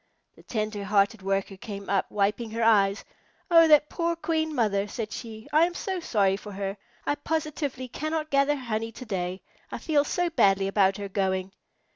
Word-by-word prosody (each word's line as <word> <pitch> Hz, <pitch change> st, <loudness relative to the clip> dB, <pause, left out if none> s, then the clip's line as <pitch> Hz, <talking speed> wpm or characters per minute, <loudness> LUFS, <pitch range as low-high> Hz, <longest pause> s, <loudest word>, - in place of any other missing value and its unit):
The -, -, -17 dB
tender 215 Hz, -2 st, -3 dB
hearted 200 Hz, +1 st, +2 dB
Worker 195 Hz, 0 st, -1 dB
came 200 Hz, 0 st, -7 dB
up 195 Hz, -1 st, 0 dB
wiping 210 Hz, +3 st, 0 dB
her 225 Hz, +1 st, -2 dB
eyes. 200 Hz, -3 st, +3 dB, 0.5 s
"Oh, 330 Hz, -1 st, +8 dB
that 300 Hz, -1 st, +6 dB
poor 335 Hz, +1 st, -1 dB
Queen 315 Hz, -2 st, -1 dB
Mother!" 205 Hz, -5 st, +1 dB
said 215 Hz, 0 st, -5 dB
she. 225 Hz, +1 st, -8 dB
"I 320 Hz, +3 st, +6 dB
am 350 Hz, -, -8 dB
so 380 Hz, -2 st, -3 dB
sorry 200 Hz, -, +1 dB
for 205 Hz, 0 st, -9 dB
her. 195 Hz, 0 st, -3 dB, 0.3 s
I -, -, +2 dB
positively 290 Hz, -3 st, -3 dB
cannot 310 Hz, +4 st, -3 dB
gather 280 Hz, +1 st, +3 dB
honey 225 Hz, -4 st, -3 dB
to 255 Hz, -, -9 dB
day, 185 Hz, -3 st, -3 dB, 0.3 s
I -, -, -3 dB
feel 300 Hz, -3 st, +2 dB
so 350 Hz, +3 st, -1 dB
badly 195 Hz, -9 st, +3 dB
about 195 Hz, 0 st, +3 dB
her 200 Hz, -1 st, -5 dB
going." 190 Hz, -1 st, -1 dB
220 Hz, 180 wpm, -27 LUFS, 195-295 Hz, 0.5 s, Oh